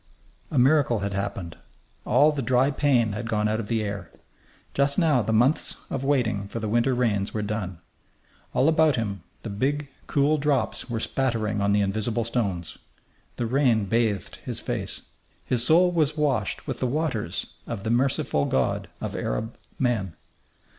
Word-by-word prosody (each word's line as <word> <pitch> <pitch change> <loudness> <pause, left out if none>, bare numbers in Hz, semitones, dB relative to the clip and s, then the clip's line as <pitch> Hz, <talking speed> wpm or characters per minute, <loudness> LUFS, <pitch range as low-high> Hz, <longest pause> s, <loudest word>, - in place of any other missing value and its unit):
A 150 - -2
miracle 130 -4 +4
had 100 0 -2
happened. 95 -3 -4 0.5
All 150 +2 +5
the 145 -2 -3
dry 130 +3 +3
pain 130 -6 +2
had 115 +3 -4
gone 105 -1 +1
out 110 +1 0
of 110 - -4
the 110 -1 0
air. 100 -4 -5 0.6
Just 140 0 +2
now 155 -8 +4
the 110 - -2
months 125 +7 +2 0.2
of 135 - -2
waiting 120 -8 +1
for 115 - -5
the 110 - -3
winter 120 +4 +2
rains 110 -5 0
were 105 - -1
done. 100 -4 -3 0.7
All 135 - +2
about 160 -3 +4
him 100 -5 -3 0.2
the 110 - -5
big, 140 +7 -1 0.2
cool 145 +2 +2
drops 140 -3 0
were 115 -2 -2
spattering 110 -5 -1
on 100 0 +2
the 105 0 +3
invisible 110 +4 0
stones. 100 -8 -2 0.6
The 120 - -2
rain 120 -3 +2
bathed 110 -2 0
his - - -5
face. - - -3 0.4
His 120 -2 +2
soul 175 +6 +5
was 155 -3 +1
washed 135 -9 0
with - - -4
the 130 - 0
waters 125 - -2
of 110 -4 -5
the 110 - -1
merciful 120 - +1
God 65 - 0
of - - -4
Arab 110 - -3 0.2
men. 110 - 0
115 Hz, 165 wpm, -25 LUFS, 105-135 Hz, 0.7 s, All